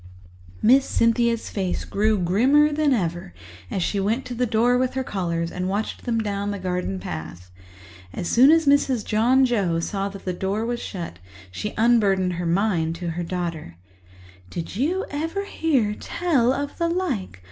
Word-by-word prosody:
Miss 260 +4 +6
Cynthia's 230 -1 +1
face 190 -3 -2
grew 215 +1 +1
grimmer 255 - +3
than 300 -1 +2
ever 175 - -2 0.3
as 185 - -1
she 200 - -1
went 220 +7 0
to 250 - -5
the 250 +1 0
door 235 +2 +3
with 255 +1 0
her 265 - -1
callers 170 -6 -2
and 180 +1 -3
watched 205 +3 -3
them 235 -2 0
down 205 -2 -2
the 205 - -3
garden 180 - -3
path. 85 +1 -7 0.6
As 170 - -4
soon 255 +8 +6
as 325 0 +5
Mrs. 280 -5 +2
John 245 +5 +3
Joe 195 -9 +1
saw 195 +3 -2
that 195 0 -11
the 185 - -1
door 195 +5 -2
was 240 0 -2
shut, 170 - -6 0.3
she 210 - -5
unburdened 205 -5 +3
her 175 0 -3
mind 170 -3 +1
to 170 0 -4
her 175 +2 -4
daughter. 170 - -4 0.7
"Did 170 - -6
you 325 - 0
ever 325 +7 -3
hear 270 - 0
tell 270 -1 +1
of 285 +4 -4
the 335 - +2
like? 275 - -2
210 Hz, 170 wpm, -23 LUFS, 180-255 Hz, 0.7 s, Miss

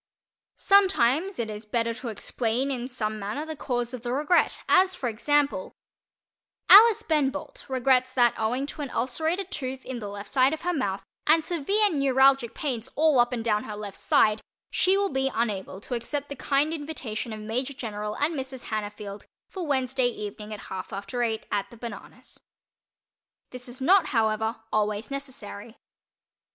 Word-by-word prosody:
Sometimes 380 -3 +3
it 235 - -2
is 210 0 -6
better 230 +1 -1
to 240 +2 -8
explain 235 +4 -1
in 250 -2 -3
some 215 -4 -3
manner 210 +10 -4
the 315 0 -6
cause 245 -3 -2
of 250 - -6
the 240 0 -4
"regret," 300 +7 +2
as 375 0 +4
for 265 - -3
example: 275 -1 0 1.0
Alice 445 +1 +9
Ben 300 -7 +2
Bolt 290 +1 -8
regrets 255 0 +2
that, 240 -2 +4
owing 245 +5 -1
to 295 - -7
an 280 - -4
ulcerated 320 +11 -1
tooth 260 -1 -4
in 255 -2 -5
the 210 - -6
left 200 0 -8
side 265 +3 +4
of - - -15
her 355 +1 0
mouth, 200 - -2 0.2
and 315 +1 +4
severe 390 +6 +1
neuralgic 270 -3 +3
pains 260 -4 -3
all 305 -3 +4
up 240 +1 +4
and 235 -2 -3
down 210 -2 +1
her 210 - -6
left 210 -2 -7
side, 215 0 +3 0.3
she 380 +1 +3
will 400 0 +1
be 265 0 +1
unable 200 -4 -2
to 250 - -7
accept 280 +5 -3
the 280 - -5
kind 285 +3 +1
invitation 275 -8 -5
of 215 - -6
Major 245 +6 -2
General 210 -4 -4
and 295 +3 +1
Mrs. 265 -3 -6
Hannafield 210 -1 -5 0.2
for 365 -4 -5
Wednesday 260 -2 +1
evening 210 -2 -6
at 210 - -6
half 190 -1 -7
after 200 +5 -4
eight, 225 -2 -1
at 205 -1 -1
"The 235 - -14
Bananas." 235 0 -9 1.1
This 250 0 -8
is 245 +2 -9
not, 360 +6 +4
however, 220 -1 0
always 210 +2 0
necessary. 250 -5 -7
255 Hz, 170 wpm, -26 LUFS, 220-290 Hz, 1.1 s, Alice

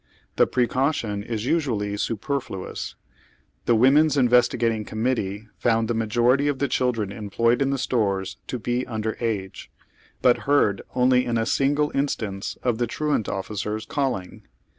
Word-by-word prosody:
The - - +4
precaution 125 -4 0
is 110 +1 -4
usually 115 -10 0
super 115 +7 -1
fluous. 95 -8 -7 0.7
Tiie 120 - +4
Women's 145 +5 +5
Investigating 120 -3 +3
Coiniuittee 110 -2 -2
found 115 -1 +2
tlie 120 - 0
majority 120 +5 +2
of 145 -2 0
the 140 - 0
childi'en 115 -7 0
employed 115 +4 +1
in 135 - +2
the 140 - 0
stores 100 -7 -1
to 125 - -3
be 120 +2 -1
un 110 -3 -3
der 110 0 -2
age, 105 -5 -3 0.5
but 125 +2 +3
heard 105 -9 +3
only 125 0 +4
in 120 -1 0
a 115 - +1
single 145 +4 +1
instance 110 -8 -2
of 120 -2 0
the 120 - +1
ti'uant 150 -2 -1
officers 105 +2 -3
calling. 130 -10 -3
120 Hz, 150 wpm, -24 LUFS, 105-130 Hz, 0.7 s, Women's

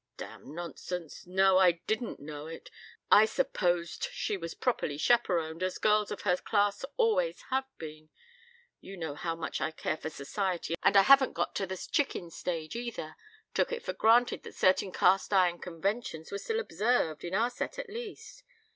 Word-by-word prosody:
"Damn 150 - -9
nonsense. 175 -1 -6
No, 190 +1 +4
I 180 -2 +6
didn't 220 +7 -3
know 150 +1 -7
it. 165 - -9 0.4
I 215 - +9
supposed 185 - 0
she - - -2
was 170 -3 -6
properly 190 - -1
chaperoned, 170 -6 +1
as 185 0 -1
girls 210 -1 +3
of - - -5
her 180 -3 +2
class 205 +2 +1
always 485 +1 +2
have 265 0 +1
been. 155 -1 -9 0.7
You 195 0 -10
know 160 -4 -4
how 165 +3 -3
much 165 -1 -4
I 155 - +1
care 160 0 -3
for 160 - -5
Society, 175 +3 -3
and - - +5
I 195 - +8
haven't 275 +1 +6
got - - -1
to 195 - -1
the 190 0 -4
chicken 180 -8 -1
stage 165 -1 -4
either. 235 -10 -5 0.4
Took - - +1
it 475 0 -3
for - - -3
granted 235 +2 +4
that - - -11
certain 185 0 +3
cast 190 +3 +3
iron 180 -3 +3
conventions 180 -1 -3
were 200 - -3
still 450 - -2
observed, 215 - 0
in 175 +2 -3
our 230 +4 +2
set 245 - -5
at - - -5
least. 470 +3 -8
190 Hz, 175 wpm, -30 LUFS, 165-235 Hz, 0.7 s, I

